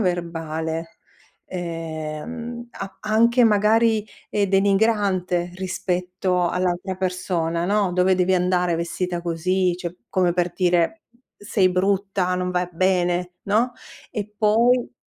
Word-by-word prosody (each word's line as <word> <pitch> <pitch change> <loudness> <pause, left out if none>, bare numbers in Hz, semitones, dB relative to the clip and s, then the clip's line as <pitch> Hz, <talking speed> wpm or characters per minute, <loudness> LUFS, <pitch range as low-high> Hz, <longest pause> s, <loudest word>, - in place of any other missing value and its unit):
verbale, 165 -3 -3 0.5
ehm, 170 +8 -5
a 195 0 -7
anche 235 +3 +4
magari, 220 +1 +3 0.3
ehm, 205 -1 +1
denigrante 195 -3 +2
rispetto 180 -1 -1
all'altra 180 +1 -1
persona, 180 -3 -1
no. 200 -2 +1
"Dove 185 +1 +3
devi 185 +1 +2
andare 180 -1 +2
vestita 170 +1 -2
così?" 175 +2 0
Cioè, 175 -1 -5
come 180 -2 +2
per 175 0 0
dire: 180 - +1 0.3
"Sei 205 -3 +1
brutta, 190 0 +1
non 180 0 -1
vai 180 -1 -1
bene", 180 0 +1
no; 225 +5 +2 0.4
e 210 -3 -4
poi 235 +4 +3
185 Hz, 110 wpm, -23 LUFS, 175-205 Hz, 0.5 s, anche